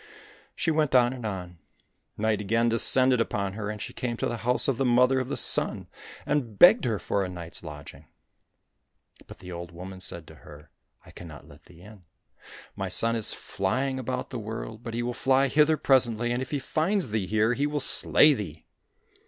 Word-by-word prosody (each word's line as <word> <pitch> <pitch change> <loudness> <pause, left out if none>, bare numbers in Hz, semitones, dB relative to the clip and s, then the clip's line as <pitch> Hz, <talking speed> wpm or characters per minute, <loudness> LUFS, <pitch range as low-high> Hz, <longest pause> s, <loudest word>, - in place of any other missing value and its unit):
She 165 - -1
went 150 -4 0
on 125 0 +4
and 120 -4 -6
on. 90 -4 -7 0.6
Night 110 0 0
again 115 +3 +1
descended 125 +2 +3
upon 100 -3 -2
her, 105 0 -5
and 105 0 -6
she - - -7
came 120 -2 -4
to - - -2
the 120 - -3
house 125 +3 +1
of 135 -4 0
the 135 - 0
Mother 125 +1 +3
of 130 - -4
the - - -3
Sun, - - +1 0.4
and 125 -8 -2
begged 210 - +7
her 115 -4 0
for 100 +2 -2
a 90 - -4
night's 85 -2 -8
lodging. 75 -3 -11 1.2
But - - -12
the 90 - -11
old 85 0 -8
woman 95 +2 -10
said 85 -3 -5
to 80 - -14
her, 75 +1 -15 0.2
" - - -35
I - - -15
cannot 80 -4 -12
let - - -18
thee 85 -1 -18
in. 100 -1 -15 0.7
My - - -4
son 115 0 +3
is 110 -2 +3
flying 130 +7 -3
about 130 +1 -5
the 125 - -5
world, 110 0 -7
but 115 -2 -7
he 120 - -2
will 120 0 -3
fly 135 +2 +2
hither 155 +2 +3
presently, 120 -4 +2
and 120 +1 -2
if 130 - -6
he 145 - -2
find 165 +8 -1
thee 110 - -3
here 110 +4 +1
he 140 +4 -1
will 150 0 -2
slay 150 +2 +5
thee 90 - -7
115 Hz, 200 wpm, -26 LUFS, 95-130 Hz, 1.2 s, begged